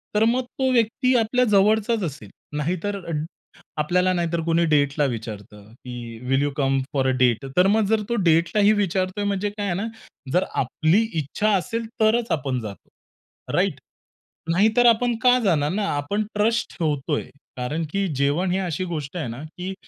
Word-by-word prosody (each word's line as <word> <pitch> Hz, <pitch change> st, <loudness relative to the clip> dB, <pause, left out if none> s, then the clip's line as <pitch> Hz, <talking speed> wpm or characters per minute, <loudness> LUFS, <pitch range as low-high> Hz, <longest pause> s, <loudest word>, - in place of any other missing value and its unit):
तर 210 Hz, -, +4 dB
मग 245 Hz, +3 st, +2 dB, 0.2 s
तो 260 Hz, -1 st, +2 dB
व्यक्ती 250 Hz, +2 st, +2 dB
आपल्या 240 Hz, +2 st, +2 dB
जवळचाच 215 Hz, +1 st, +3 dB
असेल. 145 Hz, -, -6 dB, 0.3 s
नाहीतर 180 Hz, +6 st, -2 dB, 0.8 s
आपल्याला, 180 Hz, +4 st, +2 dB
नाहीतर 170 Hz, -1 st, -1 dB
कुणी 170 Hz, 0 st, +2 dB
डेटला 145 Hz, -1 st, +2 dB
विचारतं 105 Hz, -2 st, -8 dB
की, 120 Hz, -2 st, -9 dB
will 135 Hz, +1 st, +3 dB
you 145 Hz, -, +1 dB
come 135 Hz, -1 st, +2 dB
for 135 Hz, -2 st, +1 dB
a -, -, +3 dB
date? 125 Hz, 0 st, +2 dB
तर 180 Hz, +1 st, +6 dB
मग, 215 Hz, +1 st, +3 dB
जर 220 Hz, +1 st, +1 dB
तो 235 Hz, -, 0 dB
डेटला 170 Hz, +5 st, +3 dB
ही 205 Hz, -, +6 dB
विचारतोय, 190 Hz, 0 st, -1 dB
म्हणजे 200 Hz, 0 st, -1 dB
काय 205 Hz, 0 st, -5 dB
आहे 185 Hz, -3 st, -1 dB
ना, 200 Hz, +5 st, -2 dB, 0.5 s
जर 180 Hz, -, +3 dB, 0.2 s
आपली 160 Hz, -, +2 dB, 0.2 s
इच्छा 155 Hz, +9 st, -1 dB
असेल, 230 Hz, +5 st, -3 dB, 0.2 s
तरच 225 Hz, +2 st, +2 dB
आपण 135 Hz, -4 st, -1 dB
जातो, 105 Hz, -3 st, -9 dB, 0.7 s
राइट? -, -, +1 dB, 0.7 s
नाहीतर 220 Hz, +7 st, +3 dB
आपण 235 Hz, +1 st, +3 dB
का 250 Hz, 0 st, +6 dB
जाणार 150 Hz, -5 st, +2 dB
ना? 205 Hz, +3 st, -1 dB
आपण 200 Hz, +9 st, -1 dB
ट्रस्ट 225 Hz, +3 st, 0 dB
ठेवतोय 150 Hz, -2 st, -1 dB, 0.3 s
कारण 145 Hz, +6 st, -2 dB
की 195 Hz, 0 st, 0 dB
जेवण 145 Hz, +7 st, +1 dB
ही 185 Hz, -, +1 dB
अशी 185 Hz, -1 st, -2 dB
गोष्ट 160 Hz, -2 st, -5 dB
आहे 155 Hz, -7 st, -3 dB
ना, 120 Hz, +5 st, -7 dB
की 180 Hz, +4 st, -6 dB
180 Hz, 170 wpm, -23 LUFS, 145-210 Hz, 0.8 s, तर